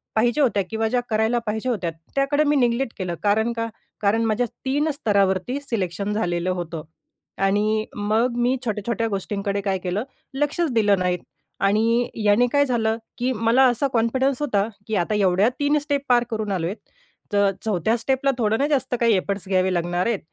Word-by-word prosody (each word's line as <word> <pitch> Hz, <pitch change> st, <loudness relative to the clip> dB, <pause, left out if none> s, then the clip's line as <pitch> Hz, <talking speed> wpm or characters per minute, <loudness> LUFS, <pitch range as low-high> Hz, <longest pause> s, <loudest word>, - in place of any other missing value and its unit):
पाहिजे 240 Hz, +6 st, +2 dB
होत्या 215 Hz, -8 st, +2 dB
किंवा 225 Hz, 0 st, -1 dB
ज्या 245 Hz, +1 st, +1 dB
करायला 220 Hz, +2 st, +2 dB
पाहिजे 220 Hz, +4 st, -2 dB
होत्या 195 Hz, -8 st, -1 dB, 0.3 s
त्याकडे 285 Hz, +2 st, +2 dB
मी 295 Hz, 0 st, +2 dB
निग्लेक्ट 240 Hz, -1 st, +1 dB
केलं. 180 Hz, -3 st, -3 dB
कारण 220 Hz, +3 st, +2 dB
का? 230 Hz, 0 st, -2 dB, 0.4 s
कारण 215 Hz, +3 st, +2 dB
माझ्या 225 Hz, +2 st, +1 dB, 0.2 s
3 290 Hz, +4 st, +1 dB
स्तरावरती 205 Hz, -1 st, +1 dB
सिलेक्शन 200 Hz, -5 st, -2 dB
झालेलं 175 Hz, -3 st, -1 dB
होतं 170 Hz, -3 st, -5 dB, 0.6 s
आणि 215 Hz, +2 st, +1 dB
मग 220 Hz, +4 st, +1 dB
मी 245 Hz, +2 st, +2 dB
छोट्या-छोट्या 225 Hz, +2 st, -1 dB
गोष्टींकडे 200 Hz, 0 st, -2 dB
काय 195 Hz, -1 st, 0 dB
केलं, 185 Hz, +5 st, -1 dB, 0.3 s
लक्षच 295 Hz, +2 st, 0 dB
दिलं 205 Hz, -4 st, +3 dB
नाहीत 180 Hz, -1 st, 0 dB, 0.4 s
आणि 225 Hz, +5 st, +2 dB, 0.2 s
याने 210 Hz, +4 st, +4 dB
काय 285 Hz, 0 st, +4 dB
झालं, 225 Hz, -3 st, 0 dB, 0.2 s
की 250 Hz, +1 st, 0 dB
मला 230 Hz, +4 st, +3 dB
असा 245 Hz, +3 st, +1 dB
कॉन्फिडन्स 260 Hz, +4 st, +1 dB
होता, 210 Hz, -8 st, +1 dB, 0.2 s
की 220 Hz, -, -1 dB
आता 195 Hz, +3 st, 0 dB
एवढ्या 195 Hz, 0 st, +3 dB
3 290 Hz, +1 st, +2 dB
स्टेप 285 Hz, -1 st, -1 dB
पार 240 Hz, -1 st, +5 dB
करून 215 Hz, -2 st, -2 dB
आलोय 180 Hz, 0 st, -1 dB, 0.6 s
तर 200 Hz, -1 st, +4 dB, 0.2 s
4थ्या 215 Hz, +2 st, +1 dB
स्टेप 265 Hz, +3 st, -1 dB
ला 275 Hz, -, +5 dB
थोडं 220 Hz, -1 st, +1 dB
ना, 285 Hz, -, +2 dB
जास्त 265 Hz, -4 st, 0 dB
काही 230 Hz, -2 st, +4 dB
एफर्ट्स 195 Hz, 0 st, -3 dB
घ्यावे 185 Hz, 0 st, +2 dB
लागणार 175 Hz, +3 st, 0 dB
आहेत. 230 Hz, -4 st, 0 dB
220 Hz, 175 wpm, -23 LUFS, 200-245 Hz, 0.6 s, पार